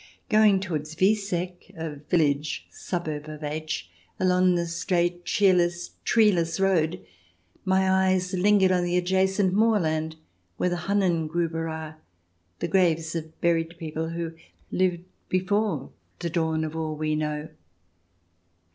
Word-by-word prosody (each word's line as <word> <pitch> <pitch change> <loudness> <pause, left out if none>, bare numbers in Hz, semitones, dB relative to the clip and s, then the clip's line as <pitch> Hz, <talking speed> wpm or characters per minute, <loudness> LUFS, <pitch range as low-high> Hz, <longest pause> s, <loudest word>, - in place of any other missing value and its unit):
Going 215 -3 +5
towards 160 -5 -4
Wieseck, 185 -1 0
a 160 -2 -5
village 150 -1 0
suburb 155 -4 -4
of 155 0 -8
H, 155 - -3 0.3
along 185 0 +3
the 170 0 0
straight, 175 +1 -1
cheerless, 175 -3 +2
treeless 190 -7 +3
road, 165 - +1 0.6
my 190 0 +3 0.2
eyes 185 0 +1
lingered 190 0 +4
on 180 -1 +2
the 175 0 +1
adjacent 190 +1 +2
moorland, 160 -8 +2 0.4
where 180 - +1
the 175 - 0
Hunnen 180 -6 +1
grdber 165 0 -1
are 160 0 -7 0.3
— 90 +1 -44
the - - 0
graves 165 -3 +2
of 160 -1 -6
buried 165 0 +1
people 160 0 -4
who 165 0 -4 0.4
lived 180 -2 +1 0.3
before 185 -5 0 0.3
the 170 -1 -4
dawn 160 -1 0
of 155 0 -4
all 160 -1 -2
we 155 0 -1
know. 150 0 -2
170 Hz, 130 wpm, -26 LUFS, 160-185 Hz, 0.6 s, Going